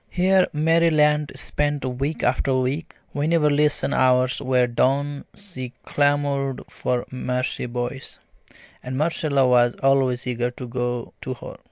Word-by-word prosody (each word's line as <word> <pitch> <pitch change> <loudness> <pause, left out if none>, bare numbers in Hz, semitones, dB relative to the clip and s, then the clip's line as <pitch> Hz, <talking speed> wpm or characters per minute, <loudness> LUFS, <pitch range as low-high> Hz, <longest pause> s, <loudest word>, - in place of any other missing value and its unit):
Here 185 +1 +3
Mary 165 +2 +3
Lant 150 -1 +2
spent 145 -2 -1
week 135 +5 -3
after 130 +1 +1
week. 130 +5 -2 0.2
Whenever 150 +1 +2
lesson 150 0 +2
hours 130 0 +2
were 130 -2 +2
done 140 +4 0
she 130 -12 -8
clamoured 145 -2 0
for 125 -1 -2
Marcie 125 0 -2
Boyce, 125 +2 -5 0.6
and 130 +1 -5
Marcella 145 -3 +1
was 120 -1 +4
always 135 -2 +2
eager 120 -1 -1
to 125 +1 -9
go 120 -1 -3
to 130 - -4
her. - - -10
135 Hz, 135 wpm, -23 LUFS, 125-150 Hz, 0.6 s, was